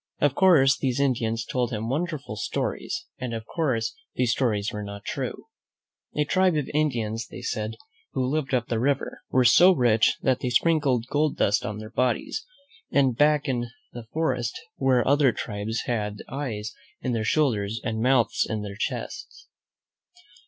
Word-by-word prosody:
Of 145 -3 +3
course, 140 -8 +5
these 130 -1 0
Indians 115 -4 0
told 125 -1 -1
him 110 -2 -3
wonderful 150 +2 -3
stories, 360 0 -3
and, 125 -2 -3
of 110 -1 -6
course, 125 -9 -1 0.2
these 125 -2 +2
stories 110 -6 0
were 105 - -4
not 100 0 -8
true. - - -4 0.7
A 150 - +2
tribe 185 +2 +3
of 150 -3 -1
Indians, 115 -7 0
they - - -10
said, 110 +1 -3 0.4
who 130 - 0
lived 140 0 -1
up 125 -3 +1
the 115 - -1
river, 135 +3 -1
were 130 -1 +3
so 175 +10 +8
rich 115 -4 +3
that 130 -1 +2
they 125 - -2
sprinkled 135 -3 +2
gold 150 0 +1
dust 100 +1 +2
on 105 - -4
their 110 0 -8
bodies; 125 - 0 0.5
and 135 -4 +3
back 150 +2 +3
in 120 -2 -1 0.3
the 120 -2 -8
forest 130 -7 -1 0.2
were 130 -2 +3
other 140 -1 +5
tribes 110 +1 -3
who - - -4
had 105 -3 -2
eyes 110 -6 -4 0.3
in 130 - -1
their 115 -2 0
shoulders 110 -6 +1
and 110 -3 -2
mouths 125 -1 +3
in 110 -2 -2
their 100 -1 -6
chests. 425 - -5
125 Hz, 165 wpm, -26 LUFS, 110-140 Hz, 0.7 s, so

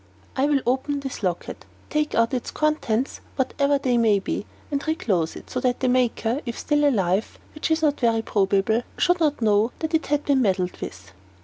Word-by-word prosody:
"I 270 +2 +2
will 285 -2 +2
open 265 +3 0
this 270 -3 -6
locket, 180 -4 -3 0.3
take 300 -1 0
out 230 +2 +2
its 250 - -2
contents, 280 -5 -1
whatever 280 +2 +1
they 250 -3 +1
may 220 -3 +4
be, 195 +1 -3 0.2
and 280 -1 -1
reclose 190 - 0
it - - -10
so 255 - -1
that 250 -1 0
the 260 - 0
maker, 250 0 +1
if 235 -3 -5
still 295 -1 +2
alive 195 -4 0 0.2
which 305 - -3
is 320 0 +1
not 295 -2 +2
very 230 -2 +2
probable 200 +2 +2 0.2
should 355 0 +3
not 295 -6 +1
know 215 +2 +3
that 320 0 -4
it 320 - +1
had 295 +1 0
been 275 -2 +3
meddled 185 -5 0
with." 95 +1 -8
250 Hz, 195 wpm, -24 LUFS, 215-290 Hz, 0.3 s, may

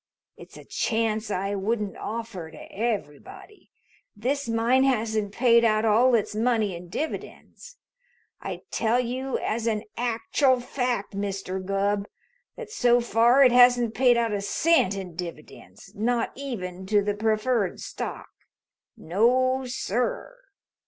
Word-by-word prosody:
It's - - -14
a - - -13
chance 220 -1 -1
I 195 0 -2
wouldn't 205 0 -2
offer 220 -7 -6
to - - -13
everybody. 215 - -5 0.5
This 255 +4 -2
mine 235 +3 +3
hasn't 220 -5 0
paid 235 +1 +4
out 215 -1 +2
all 235 +4 +4
its 215 -2 -1
money 220 -3 0
in 175 +1 -10
dividends. 480 - -7 0.6
I - - -6
tell 235 +1 +1
you 255 +2 -2
as 230 +1 -2
an 215 -2 0
actual 245 +3 +1
fact, 245 -5 -3
Mr. 195 -1 -4
Gubb, 200 +1 -1 0.5
that 470 -3 -9
so 245 - +3
far 240 +3 +4
it 255 - +6
hasn't 245 -2 +5
paid 245 -1 +4
out 230 -2 0
a 200 - -1
cent 200 - +2
in 185 -3 -7
dividends, 170 -3 -10
not 235 +3 0
even 190 -9 -6
to 205 0 +3
the 205 0 0
preferred 215 -1 0
stock. - - -6 0.7
No, 255 +8 +1
sir! 245 - -2
225 Hz, 130 wpm, -25 LUFS, 205-245 Hz, 0.7 s, it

